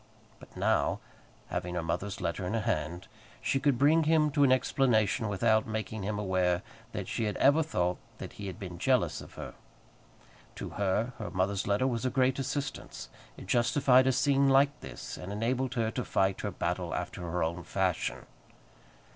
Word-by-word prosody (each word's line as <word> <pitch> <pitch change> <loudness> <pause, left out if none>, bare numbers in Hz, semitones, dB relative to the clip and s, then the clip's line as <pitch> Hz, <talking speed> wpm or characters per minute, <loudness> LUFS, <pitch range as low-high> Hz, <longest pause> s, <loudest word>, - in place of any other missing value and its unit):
But - - -15
now, - - +1 0.5
having 90 0 -3
her 85 - -1
mother's 90 +5 -3
letter 85 0 -2
in 110 - -1
her 115 - 0
hand, 85 -2 -2 0.3
she 135 - 0
could 140 -3 +2
bring 155 +4 +4
him 155 -1 +3
to 145 0 +3
an 135 - +5
explanation 120 -4 +2
without 110 +2 +2
making 110 0 -4
him 105 +2 -2
aware 95 -3 +1 0.3
that - - -5
she 115 - -1
had 105 - -2
ever 145 +4 +5
thought 90 - -1 0.2
that - - -8
he 100 - -7
had 95 +2 -7
been 90 -4 -7
jealous 130 +3 +1
of - - -13
her. - - -7 1.0
To - - -6
her, 105 +5 0
her - - -4
mother's 95 +1 -1
letter 105 +5 +2
was 120 -3 -1
a 130 - +1
great 130 +1 +2
assistance. 135 +1 -4 0.3
It - - -9
justified 125 +4 +4
a - - +5
scene 135 +1 +3
like 140 +2 +4
this, - - -8
and 90 - -7
enabled 125 +4 -1
her 115 -2 0
to 125 - -3
fight 95 -2 +1
her - - -2
battle - - -2
after - - -4
her 90 0 -1
own 85 +2 -2
fashion. 95 -2 -1
110 Hz, 180 wpm, -30 LUFS, 95-130 Hz, 1.0 s, an